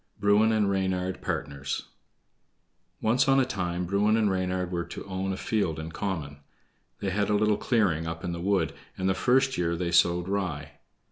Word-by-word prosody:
Bruin 105 +2 +4
and 110 -2 +2
Reynard 95 -1 -1
Partners 70 0 -3 1.1
Once 120 +5 +3
on 135 0 +5
a 130 - +3
time 90 -5 -2
Bruin 105 +4 +2
and 105 -3 +2
Reynard 90 -1 -1
were 85 -1 -1
to - - -8
own 95 0 -3
a 95 - -3
field 95 -8 -1
in 80 +1 -6
common. 80 -7 -4 0.6
They 95 - -1
had 100 +2 0
a 105 - +3
little 105 0 +3
clearing 100 - +1
up 80 0 -5
in 90 - -2
the 85 0 -4
wood, 100 +1 +1 0.2
and 95 - -1
the 95 - +3
first 130 +6 +2
year 85 -1 +1
they 85 0 -2
sowed 85 +1 +3
rye. 85 -7 -2
95 Hz, 185 wpm, -27 LUFS, 85-105 Hz, 1.1 s, on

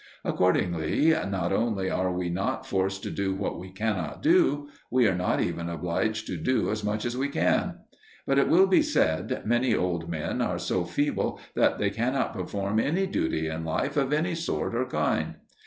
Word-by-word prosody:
Accordingly 90 - +2 0.2
not 95 -2 -1
only 100 -3 0
are 95 0 0
we 90 -1 -2
not 95 +3 -2
forced 95 0 -1
to - - -4
do 95 -1 -1
what 95 - -3
we 95 +1 -8
cannot 95 -2 -3
do; 300 - +3 0.2
we 125 -2 +4
are 95 - +2
not 90 0 0
even 85 0 -2
obliged 90 +6 -1
to - - -4
do 130 -4 +1
as 105 0 -3
much 105 +2 -1
as 120 0 -2
we 135 +2 0
can. - - +1 0.5
But, 135 0 +3
it - - +3
will 185 +4 +6
be 190 +9 +4
said, 90 - 0
many 120 +1 +2
old 85 -2 -1
men 85 +9 -2
are 90 -7 0
so 90 0 -1
feeble 145 +12 -1
that - - +3
they 100 -1 0
cannot 125 +6 0
perform 100 +2 -2
any 170 +11 +1
duty 80 - -1
in 80 +1 -4
life 80 0 -1
of 140 -2 +1
any 160 +4 +1
sort 165 -6 -2
or 120 +2 0
kind. - - 0
100 Hz, 190 wpm, -27 LUFS, 90-130 Hz, 0.5 s, will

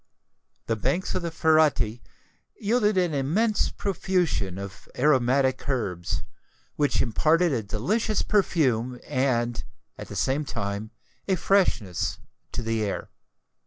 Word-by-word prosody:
The 115 - 0
banks 135 - -1
of - - -1
the 170 - -2
Ferretti 155 -8 +2 0.6
yielded 210 -1 +2
an 175 -3 +2
immense 185 +11 +1
profusion 180 - -1
of 100 0 -9
aromatic 130 -1 +2
herbs, 95 -10 -2 0.5
which 145 -1 +2
imparted 160 +8 +2
a 120 - 0
delicious 195 - 0
perfume 130 - +1
and, 120 -3 0 0.4
at - - -7
the - - -8
same 135 +3 +1
time, 100 -4 -4 0.4
a 190 - +3
freshness 165 - +1 0.3
to - - -3
the 115 0 -1
air. 100 -2 -3
135 Hz, 120 wpm, -26 LUFS, 115-175 Hz, 0.6 s, a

